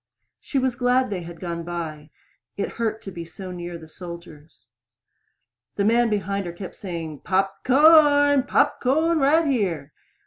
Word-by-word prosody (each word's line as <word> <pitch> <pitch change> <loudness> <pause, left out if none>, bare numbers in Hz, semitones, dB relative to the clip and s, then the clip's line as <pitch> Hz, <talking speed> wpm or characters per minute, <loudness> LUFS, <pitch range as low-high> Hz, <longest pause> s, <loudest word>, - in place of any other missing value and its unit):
She 280 - -4
was 260 -1 +1
glad 250 0 +1
they 185 -3 -3
had 170 0 -10
gone 170 -2 -4
by. 160 -3 -6 0.5
It 200 - -2
hurt 220 -1 -2
so 195 - -7
to - - -14
be 170 -2 -8 0.2
near 175 -1 -6
the 160 -1 -13
soldiers. 170 -2 -12 1.1
The 200 - 0
man 235 +2 +3
behind 200 -2 -2
her 170 - -6
kept 185 +1 -8
saying, 165 -6 -6
"Pop 195 +1 -1
corn! 290 0 +6
Pop 280 +2 +1
corn 315 +6 +2
right 305 +4 +3
here." 180 - -1
195 Hz, 160 wpm, -23 LUFS, 170-260 Hz, 1.1 s, corn